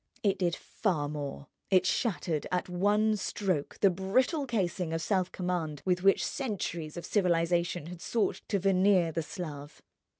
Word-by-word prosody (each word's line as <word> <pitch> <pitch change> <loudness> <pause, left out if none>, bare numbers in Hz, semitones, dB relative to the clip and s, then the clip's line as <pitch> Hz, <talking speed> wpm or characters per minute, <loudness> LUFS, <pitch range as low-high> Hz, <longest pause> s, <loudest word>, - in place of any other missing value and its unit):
It 200 -2 +2
did 175 -2 +1
far 170 -9 -1
more, 145 -1 -5 0.2
it 185 -1 +4
shattered 175 - 0
at 180 0 0
one 205 +4 +2
stroke 185 -7 -2
the 195 - +6
brittle 255 - +1
casing 180 -7 -1
of 165 - -1
self 185 -3 +1
command 175 -5 -3
with 180 -1 +1
which 195 +1 +4
centuries 175 - -3
of 175 - -5
civilization 175 -3 +1
had 175 0 -9
sought 230 -3 0
to 205 - +1
veneer 190 -2 +3
the 165 - -1
Slav. 150 -3 -7
180 Hz, 155 wpm, -30 LUFS, 165-195 Hz, 0.2 s, the